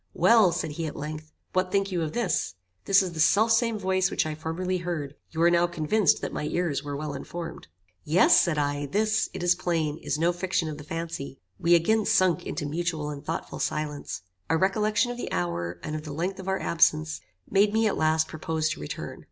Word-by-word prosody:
"Well," 220 -6 +5
said 165 -2 -2
he, 160 +2 -3
at 150 - -6
length, 155 +1 -6 0.2
"What 185 0 +1
think 195 0 +1
you 175 -2 -1
of 155 -2 -3
this? 240 -1 -1 0.3
This 195 0 +5
is 185 - -4
the 165 - -8
self 210 +8 +4
same 225 0 +2
voice 190 -1 +1
which - - 0
I 155 - -2
formerly 170 +4 -2
heard; 165 -5 -4 0.2
you 160 - -7
are 170 - +6
now 175 0 +4
convinced 175 +3 +2
that - - -3
my - - -3
ears 150 -3 -1
were 145 -1 -4
well 150 0 -4
informed." 165 +5 -7 0.4
"Yes," 165 +5 +5
said 170 -4 0
I, 145 0 -1
"this, 215 +6 +1
it - - -6
is 175 0 +5
plain, 160 -4 -1
is - - -2
no 170 +3 +2
fiction 175 -1 -1
of 150 -1 -6
the - - -8
fancy." 165 -4 -5 0.2
We 170 +1 +5
again 215 +6 +2
sunk 185 -4 +2
into 150 - -3
mutual 155 -1 -2
and 140 -1 -8
thoughtful 165 - -4
silence. 150 - -3 0.3
A 160 - +3
recollection 210 +6 +1
of 245 - -6
the - - -5
hour, 85 0 -2
and 155 - -4
of 155 - -3
the 150 -1 -7
length 180 +5 -3
of 190 - -8
our 190 0 0
absence, 75 - +2 0.3
made 205 +1 +3
me 220 +1 +2
at 210 - +1
last 155 0 +2
propose 155 0 -2
to 155 - -4
return. 150 -3 -6
165 Hz, 215 wpm, -27 LUFS, 150-185 Hz, 0.4 s, are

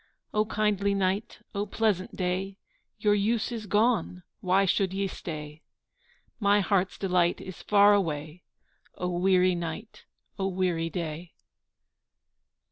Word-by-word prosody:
O 215 0 +2
kindly 205 -2 +1
night, 195 +2 -1
O 205 0 -2
pleasant 205 -3 0
day, 190 +1 -2 0.4
Your 210 0 +3
use 220 +3 +1
is 220 -3 -5
gone 210 -4 +1 0.2
why 190 +2 +3
should 190 0 +1
ye 200 0 0
stay? 155 -4 -7 0.8
My 205 -1 +4
heart's 190 -2 +1
delight 180 -3 +1
is 185 -2 -9
far 205 0 +5
away, 160 -3 -1 0.5
O 180 - -3
weary 185 +1 +3
night, 170 +5 -6 0.3
O 190 - 0
weary 180 -3 0
day. 165 -1 -5
190 Hz, 125 wpm, -28 LUFS, 180-205 Hz, 0.8 s, far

